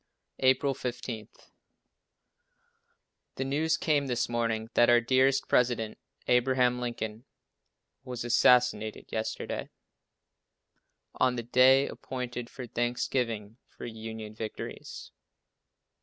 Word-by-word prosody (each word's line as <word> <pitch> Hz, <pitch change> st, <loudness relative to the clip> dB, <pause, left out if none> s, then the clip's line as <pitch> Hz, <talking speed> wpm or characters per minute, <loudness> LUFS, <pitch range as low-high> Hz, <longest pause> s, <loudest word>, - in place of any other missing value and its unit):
April 130 Hz, +1 st, +3 dB
15. 120 Hz, -4 st, -5 dB, 2.1 s
The 135 Hz, -, -2 dB
news 150 Hz, +4 st, +1 dB
came 145 Hz, -3 st, +1 dB
this 120 Hz, -2 st, 0 dB
morning 115 Hz, -1 st, -1 dB
that 120 Hz, -, +5 dB
our 120 Hz, 0 st, +7 dB
dear 130 Hz, +2 st, +4 dB, 0.2 s
president, 120 Hz, -3 st, +1 dB, 0.3 s
Abraham 125 Hz, 0 st, +3 dB
Lincoln, 115 Hz, -1 st, -4 dB, 0.8 s
was 125 Hz, -2 st, -5 dB
assassinated 120 Hz, -3 st, +3 dB
yesterday, 110 Hz, 0 st, -3 dB, 1.4 s
on 130 Hz, -1 st, +2 dB
the 120 Hz, -, -3 dB
day 130 Hz, +3 st, +5 dB
appointed 125 Hz, -2 st, -6 dB
for 130 Hz, -2 st, -8 dB
thanksgiving 120 Hz, -2 st, -2 dB
for -, -, -10 dB
Union 110 Hz, -1 st, -7 dB
victories. 110 Hz, 0 st, -7 dB
120 Hz, 95 wpm, -29 LUFS, 115-130 Hz, 2.1 s, our